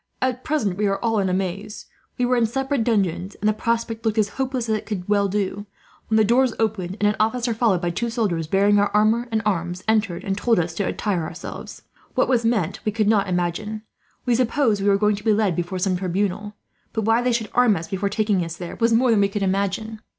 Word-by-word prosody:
"At 255 0 -1
present 220 - -1
we 210 - +2
are 195 0 0
all 225 -2 +2
in 190 -1 +1
a - - 0
maze. 195 +3 -3 0.3
We 250 - +1
were 250 +1 +2
in 235 -2 +3
separate 270 +1 -1
dungeons, 195 -4 0
and 210 - 0
the 215 - +4
prospect 230 +1 -2
looked 220 -1 0
as 210 -2 +2
hopeless 260 +1 -2
as 220 - +1
it 215 - -5
could 190 -5 -4
well 205 -1 +2
do; 205 +1 -2 0.4
when 220 - +1
the 220 - +5
doors 245 +2 +3
opened 200 -4 -2
and 210 - +3
an 210 - +1
officer, 235 +2 +1
followed 215 -6 +1
by 175 - 0
two 235 +7 -2
soldiers 200 -9 -1
bearing 200 +4 +3
our 205 - +2
armour 220 +3 +3
and 220 0 0
arms, 180 -2 -1
entered 215 -5 +1
and 195 - -1
told 235 0 +2
us 170 -1 0
to 200 +3 -2
attire 200 -5 -1
ourselves. 160 +2 -8 0.3
What - - +3
was 245 -3 +2
meant 225 -8 0
we 215 - 0
could 215 0 0
not 205 -3 +2
imagine. 180 +5 -2 0.4
We 245 - +2
supposed 235 -3 +1
we 200 - +2
were 195 - +4
going 210 0 +2
to 210 - -10
be 220 - +3
led 205 -5 +1
before 175 +2 -3
some 185 0 0
tribunal; 195 +3 -2 0.4
but 220 - -1
why 225 +2 +3
they 250 0 +1
should 230 -3 -2
arm 245 -4 +4
us, 165 -1 -5
before 200 0 -2
taking 210 -3 +1
us 165 0 -5
there, 175 -2 -7
was 230 0 +2
more 240 +2 +4
than 215 -3 +4
we 200 - +3
could 200 0 -2
imagine. 200 +3 -1
210 Hz, 240 wpm, -22 LUFS, 195-230 Hz, 0.4 s, the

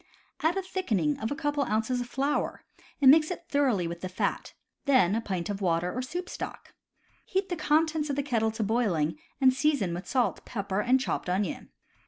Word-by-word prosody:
Add 330 +4 +2
a 385 - -1
thickening 215 - 0
of 220 - -2
a 285 - -2
couple 290 -1 -1
of 275 - -1
ounces 225 +4 0
of 245 - -5
flour, 275 +3 -1 0.4
and 270 -2 +8
mix 310 +1 +5
it 350 -2 -5
thoroughly 255 - +2
with 170 0 -6
the 185 - -4
fat; 185 - -2 0.3
then 255 -10 +4
a 225 - +1
pint 185 -6 -3
of 205 -1 -4
water 175 -1 +1
or 255 - -1
soup 350 +8 -4
stock. - - -7 0.5
Heat 385 +1 -1
the 355 - -1
contents 310 0 +1
of 280 - 0
the 285 - 0
kettle 230 -5 +1
to 220 - -2
boiling, 205 - 0 0.2
and 260 -2 +5
season 265 - +1
with 175 +2 -6
salt, 255 -3 0
pepper, 200 -3 -3
and 255 +4 +3
chopped 260 - -2
onion. 185 0 -2
250 Hz, 205 wpm, -28 LUFS, 195-290 Hz, 0.5 s, and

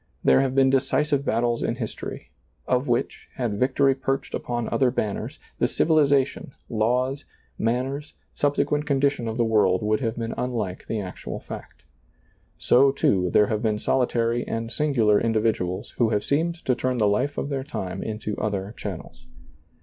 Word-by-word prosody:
There - - +5
have 135 -1 -1
been 135 -1 +5
decisive 140 +2 +1
battles 120 -2 0
in - - -1
history, - - -6 0.4
of 125 +3 +1
which, 120 -1 -1
had 115 -5 -2
vic 130 +1 +1
tory 140 -1 +4
perched 135 0 -3
upon 120 -1 -2
other 130 -2 +2
banners, 105 -5 -3 0.2
the - - +3
civilization, 140 -4 +2 0.2
laws, 125 +5 0 0.4
manners, 130 +6 -1 0.2
subsequent 145 +1 0
condition 140 -4 +1
of 110 +1 -3
the 120 - +2
world 105 -4 +3
would 110 0 +1
have 115 -2 -2
been 115 -1 -3
unlike 110 -7 -3
the 110 - -2
actual 95 -3 -6
fact. - - -10 0.7
So, 135 +3 +4
too, 95 -9 +1
there 105 - +5
have 105 0 -2
been 110 -2 +1
solitary 120 0 +1
and 115 0 -3
singular 120 -9 +2
individuals 110 -5 0
who 115 -2 +4
have 105 -2 0
seemed 165 +4 +1
to 130 - +3
turn 125 +1 -1
the 105 -3 +3
life 125 +8 0
of - - -2
their 135 -2 -2
time 95 -10 -5
into 110 -1 -4
other 100 -1 -2
channels. 95 -10 -8
120 Hz, 165 wpm, -25 LUFS, 110-135 Hz, 0.7 s, There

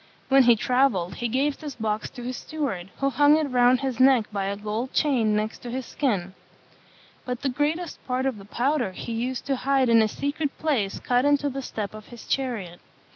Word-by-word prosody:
When 270 0 +6
he 240 -2 +6
travelled, 220 -7 +1
he 240 - -1
gave 275 +5 0
this 295 -3 -7
box 215 -2 -2
to 245 - -10
his 250 +1 -4
steward, 265 - -4
who 275 0 0
hung 290 +3 +5
it 310 -2 0
round 250 +1 +4
his 260 -3 -2
neck 260 -4 +5
by 200 -2 -2
a 200 +1 -2
gold 215 +5 -4
chain 240 -8 +2
next 215 +1 -3
his 245 +1 -4
skin. 195 -11 -1 0.9
But 250 0 -5
the 275 - +1
greatest 300 +6 -2
part 255 +1 -1
of 260 -6 -1
the 195 - -12
powder 245 -1 0
he 230 - -6
used 245 +3 -3
to 275 -1 0
hide 270 -1 +2
in 230 -1 +6
a 220 - +3
secret 285 +5 -3
place 245 -11 -1
cut 245 0 +1
into 285 0 +2
the 270 +1 -4
step 215 -6 -5
of 215 0 -11
his 240 -1 -12
chariot. 220 -10 -2
250 Hz, 205 wpm, -25 LUFS, 215-275 Hz, 0.9 s, When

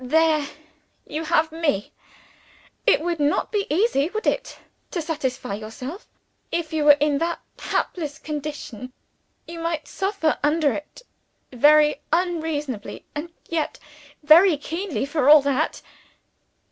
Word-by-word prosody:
There 310 +2 +2 0.6
you 310 +2 -4
have 315 0 +2
Me! 310 -11 -1 1.0
It - - +5
would 340 -1 -2
not 290 0 +1
be 410 -2 -1
easy, 325 -3 +2
would 435 +3 -4
it, - - -1 0.3
to 355 - -3
satisfy 295 -9 -3
yourself; 240 - -7 0.4
if 330 -2 -2
you 310 -2 0
were 290 -1 +8
in 290 -1 +2
that 340 +1 -1 0.2
helpless 305 -4 -2
condition? 290 -6 -6 0.5
You 335 0 -8
might 330 -2 -3
suffer 385 -4 -1
under 295 -2 +2
it 300 - -8 0.5
very 300 +3 +5
unreasonably 315 - -2
and 310 +3 -5 0.2
yet 325 -2 -2 0.5
very 320 +3 +7
keenly 330 +1 -3
for 290 -1 +1
all 300 -1 +9
that." 280 +2 -1
305 Hz, 125 wpm, -23 LUFS, 290-335 Hz, 1.0 s, all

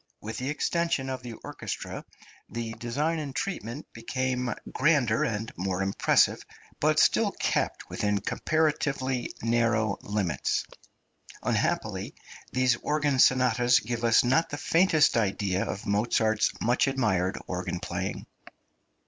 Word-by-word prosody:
With 110 +2 -6
the 130 +2 -3
extension 150 -3 0
of 130 -1 -4
the 120 -2 -7
orchestra - - -6 0.5
the 115 -1 -4
design 140 +9 -1
and 140 -3 -5
treatment 145 - -4
became 125 +1 -2 0.2
grander 135 -4 +3
and 110 -5 -2
more 95 +1 -1
impressive, 95 0 +2 0.4
but - - +2
still - - +3
kept - - -1
within 105 -1 0
comparatively 140 -1 0
narrow 115 -3 +1
limits. 100 -8 -1 0.8
Unhappily - - -1 0.4
these 130 -1 +2
organ 150 -3 0
sonatas 125 -1 +4
give 120 +1 -4
us 115 -1 +5
not 130 +7 +2
the 145 - -4
faintest 165 -4 +3
idea 100 -3 0
of 105 - -5
Mozart's 110 +1 +2
much 120 +4 +2
admired 105 -9 +1
organ 90 -1 -3
playing. 90 +3 -4
120 Hz, 120 wpm, -27 LUFS, 105-135 Hz, 0.8 s, us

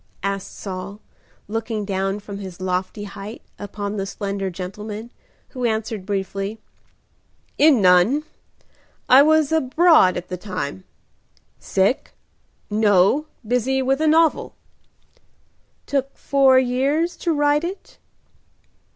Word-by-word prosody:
asked 195 -1 -3
Saul, 195 +1 -7 0.5
looking 225 -1 -3
down 195 0 -2
from 200 -1 -8
his 190 -3 -8
lofty 185 +2 -3
height 205 +2 -9 0.2
upon 205 0 -5
the 195 0 -3
slender 195 -1 -3
gentleman, 210 +5 -7 0.4
who 255 -2 -6
answered 220 -3 -2
briefly, 195 +1 -3 1.0
"In 285 -8 +5
none. 185 +11 +4 0.8
I 260 +2 +8
was 310 0 +3
abroad 315 - +4
at 175 - -6
the 180 - -5
time." 180 - -5 0.7
"Sick?" 195 +7 0 0.5
"No, 210 +6 +3 0.2
busy 255 +3 +1
with 270 +3 +1
a 315 - +2
novel." 320 0 +2 1.3
"Took 275 -1 -2
four 270 -2 +4
years 275 +7 +1
to 340 - -1
write 290 0 +2
it?" 370 +3 -7
215 Hz, 110 wpm, -21 LUFS, 195-275 Hz, 1.3 s, I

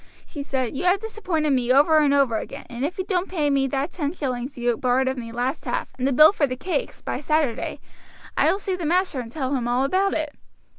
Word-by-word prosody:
"She 290 - -7
said, 265 -2 -2
'You 315 - -2
have 365 +2 +4
disappointed 370 -9 -2
me 250 -2 +2
over 295 +4 +5
and 295 -2 +3
over 275 -5 +3
again, - - -7
and 240 +2 -4
if 305 +5 -2
you 375 - -1
don't 370 -1 -1
pay 305 -6 0
me 275 -1 +2
that 275 +5 -2
ten 295 -3 -3
shillings 260 -4 -4
you 240 -1 +1
borrowed 255 +2 +1
of 260 - 0
me 230 -3 -6
last 245 +5 -2
half, - - -2
and 255 - +1
the - - +1
bill 305 +8 +7
for 290 -7 +1
the 255 - -3
cakes, 370 - -3
by - - -3
Saturday, 300 -5 -1 0.6
I - - +4
will - - 0
see 390 -2 -3
the 360 - -6
master 345 -2 +1
and 230 -2 -6
tell 265 -1 -2
him 240 -2 -1
all 245 +2 +1
about 380 +7 +1
it.' 305 -2 -2
280 Hz, 245 wpm, -23 LUFS, 255-335 Hz, 0.6 s, bill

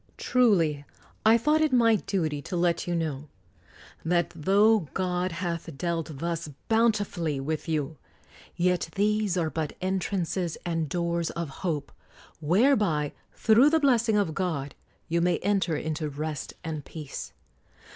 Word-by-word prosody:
Truly 175 - +2 0.4
I 220 +1 +6
thought 300 +6 +2
it 310 -2 +2
my 230 -3 +5
duty 160 -7 -2
to 180 - -4
let 170 0 +1
you 175 - 0
know, 155 -3 -3 0.7
that 175 0 +1
tho 195 +3 +3
God 180 -1 0
hath 170 -3 -4
dealt 165 -2 -3
thus 170 +1 -3 0.2
bountifully 205 -10 +1
with 155 +4 -3
you, 150 -1 -1 0.6
yet 180 -1 +1
these 210 -2 +1
are 160 -3 0
but 155 -2 -3
entrances 185 -2 -1
and 165 -3 -1
doors 170 0 -1
of 170 -3 -4
hope, 150 -6 -2 0.5
whereby, 175 - +2 0.2
through 230 +6 +5
the 320 +1 +3
blessing 235 -6 +3
of 195 -6 +1
God, 155 -7 -2 0.3
you 170 +1 +1
may 175 +1 +2
enter 195 -5 +1
into 155 0 -3
rest 150 +1 -5
and 155 -3 -4
peace. 150 -2 -8
170 Hz, 135 wpm, -27 LUFS, 155-205 Hz, 0.7 s, I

